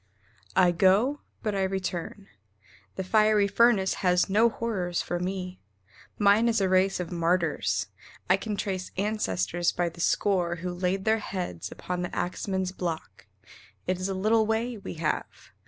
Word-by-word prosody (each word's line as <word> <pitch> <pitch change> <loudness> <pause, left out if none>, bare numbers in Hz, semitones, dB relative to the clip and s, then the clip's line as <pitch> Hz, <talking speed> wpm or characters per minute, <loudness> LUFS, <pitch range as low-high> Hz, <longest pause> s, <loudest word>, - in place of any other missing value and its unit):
I 180 -2 +5
go, 200 - +3 0.2
but 215 -2 -1
I 195 - 0
return. 190 0 -3 0.7
The 190 - -3
fiery 215 +1 +3
furnace 210 -3 +3
has 180 0 +2
no 220 +4 +5
horrors 190 -7 -2
for 175 - -3
me. 185 0 -4 0.6
Mine 205 +3 +4
is 230 -1 +2
a 195 - +2
race 185 +1 +2
of 180 -1 -4
martyrs. 170 -1 0 0.4
I 185 - +5
can 210 +2 -4
trace 190 -2 -3
Ancestors 175 - 0
by 175 -1 -1
the 170 +1 -10
score 180 -2 +1
who 180 +1 -5
laid 185 +2 -1
their 220 0 +3
heads 180 - -5
Upon 180 0 -4
the 175 - -4
axman's 190 +1 -2
block. 170 -4 -5 0.6
It 185 -1 -1
is 185 +1 -2
a 195 - -2
little 215 +3 +2
way 230 +2 0
We 200 - -7
have. 160 -1 -3
190 Hz, 155 wpm, -27 LUFS, 180-210 Hz, 0.7 s, I